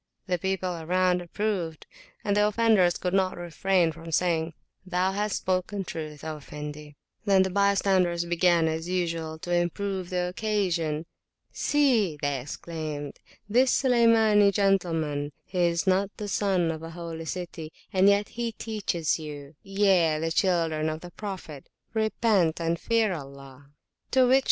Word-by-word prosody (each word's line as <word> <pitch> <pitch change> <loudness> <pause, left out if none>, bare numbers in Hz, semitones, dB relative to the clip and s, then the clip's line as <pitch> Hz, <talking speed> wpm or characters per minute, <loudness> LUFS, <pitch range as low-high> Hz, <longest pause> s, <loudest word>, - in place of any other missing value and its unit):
The 180 -2 -1
people 190 -1 -2
around 180 +2 +2
approved, 175 -3 -3 0.4
and 205 -1 +1
the 210 0 +4
offenders 210 -5 +3
could 180 0 -2
not 190 -1 +1
refrain 175 0 +1
from 165 +1 -10
saying, 165 -1 0 0.3
Thou 185 0 0
hast 205 +1 -1
spoken 185 +2 -1
truth, 155 -4 -7
O 155 -1 -4
Effendi! 150 0 -8 0.3
Then 195 -2 +5
the 190 - -2
bystanders 190 -3 +2
began, 170 -1 +3
as 160 +2 -3
usual, 165 -3 -2
to 175 +2 -4
improve 180 +2 -1
the 180 -1 -1
occasion. 180 -6 -1 0.5
See, 240 - +2
they 140 -2 -1
exclaimed, 150 0 -6 0.3
this 250 +5 +4
Sulaymani 225 -5 +5
gentleman, 165 -7 0
he 180 -2 0
is 170 +2 0
not 190 +1 +2
the 210 - -5
Son 190 -5 +1
of 160 -1 -6
a 165 - -7
Holy 165 -1 -7
City, 170 -2 -6 0.2
and 190 +1 +5
yet 200 +1 +2
he 235 -1 -3
teacheth 205 -7 -4
youye, 160 +3 0
the 165 +1 -1
children 165 -4 +1
of 155 +1 -5
the 175 - -10
Prophet!repent 195 - -2
and 165 0 -1
fear 225 -4 +1
Allah! 140 -2 -10
180 Hz, 135 wpm, -27 LUFS, 160-200 Hz, 0.5 s, Then